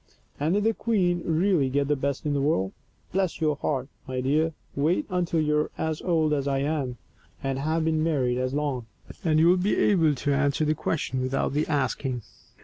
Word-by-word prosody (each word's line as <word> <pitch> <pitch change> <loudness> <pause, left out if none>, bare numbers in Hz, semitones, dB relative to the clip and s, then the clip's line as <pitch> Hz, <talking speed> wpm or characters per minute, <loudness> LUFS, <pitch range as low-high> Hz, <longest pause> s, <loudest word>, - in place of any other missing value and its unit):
And 155 +6 +1
did 205 - +1
the 225 +1 +3
queen 185 -7 +1
really 165 -3 +2
get 140 +1 +1
the 150 - +2
best 140 +1 -2
in 150 - +1
the 140 - +1
world? 95 -10 +1 0.4
Bless 190 -3 0
your 155 -2 +1
heart, 135 -3 -1 0.2
my 130 -1 -3
dear, 155 +5 +1 0.2
wait 160 - +1
until 175 -2 0
you 150 -1 +2
are 150 - -1
as 160 -1 -2
old 160 -4 +2
as 140 -1 0
I 135 -1 +1
am, 140 -3 -1 0.5
and 135 -1 -1
have 160 +3 0
been 160 -1 +1
married 130 -6 +1
as 130 0 -1
long, 140 -6 -2 0.4
and 155 -2 +2
you 165 - +5
will 180 +1 +5
be 185 +3 +1
able 165 -7 +3
to 140 +2 0
answer 140 +2 +1
that 155 +1 +1
question 135 -5 -1
without 130 +1 -1
the 150 +2 0
asking. 130 -4 -1
150 Hz, 205 wpm, -26 LUFS, 135-165 Hz, 0.5 s, you